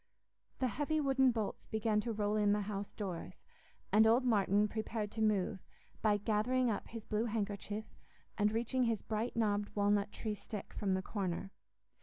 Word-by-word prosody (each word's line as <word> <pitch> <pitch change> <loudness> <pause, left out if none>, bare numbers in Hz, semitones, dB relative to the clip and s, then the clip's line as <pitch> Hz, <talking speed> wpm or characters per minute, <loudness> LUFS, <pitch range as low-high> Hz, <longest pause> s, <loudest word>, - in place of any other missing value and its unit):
The 260 - +1
heavy 295 +7 0
wooden 270 -2 +4
bolts 225 -4 -2
began 220 -1 +1
to 235 - -3
roll 210 -1 0
in 205 -1 +3
the 210 - +1
house 200 0 -4
doors, 190 -5 -6 0.5
and 220 +1 +6
old 240 +3 +4
Martin 205 -2 +3
prepared 215 -1 -3
to 220 - -4
move, 205 -3 +2 0.4
by 210 -2 +4
gathering 230 +4 +1
up 205 - -3
his 230 -2 -8
blue 215 +1 0
handkerchief, 210 -1 -3 0.5
and 210 -1 +2
reaching 240 +3 +1
his 225 -3 0
bright 220 +2 -2
knobbed 205 -2 +1
walnut 205 0 +2
tree 215 0 -3
stick 210 0 -7
from 195 -2 0
the 190 - -2
corner. 195 -2 -3
215 Hz, 170 wpm, -35 LUFS, 205-230 Hz, 0.5 s, and